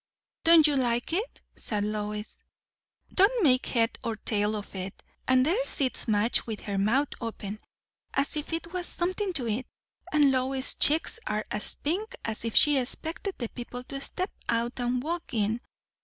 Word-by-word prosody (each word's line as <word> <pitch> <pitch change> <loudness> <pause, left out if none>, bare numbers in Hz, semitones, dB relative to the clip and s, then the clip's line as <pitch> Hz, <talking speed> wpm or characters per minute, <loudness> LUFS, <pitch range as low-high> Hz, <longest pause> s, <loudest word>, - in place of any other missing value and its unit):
"Don't 330 -2 +8
you 295 -2 +5
like 245 +2 0
it?" 420 +8 -2
said 210 -2 -2
Lois. 210 0 -4 0.7
"Don't 415 +4 +4
make 255 -4 +4
head 230 -2 +1
or 230 -1 -2
tail 210 0 -1
of 205 -1 -7
it. 190 0 -6 0.2
And 255 0 +4
there 385 - +2
sits 270 - +1
Madge 215 +2 +2
with 220 -2 -4
her 200 -2 -3
mouth 260 +8 +2
open, 215 -2 -5 0.5
as 275 +2 0
if 300 +1 -4
it 330 +1 -4
was 360 -1 -1
something 370 +3 -1
to 260 -8 0
eat; 230 +4 -2 0.4
and 295 -2 +5
Lois's 260 +1 +2
cheeks 310 +3 +4
are 210 0 -1
as 210 - +1
pink 420 +11 -3
as 225 +1 -3
if 230 - -3
she 295 -3 +6
expected 330 +9 -2
the 235 -3 -4
people 245 0 -7
to 275 +2 -7
step 370 +7 -3 0.2
out 235 +2 0
and 245 +1 0
walk 330 -4 -4
in. 220 +2 0
255 Hz, 170 wpm, -28 LUFS, 220-320 Hz, 0.7 s, Don't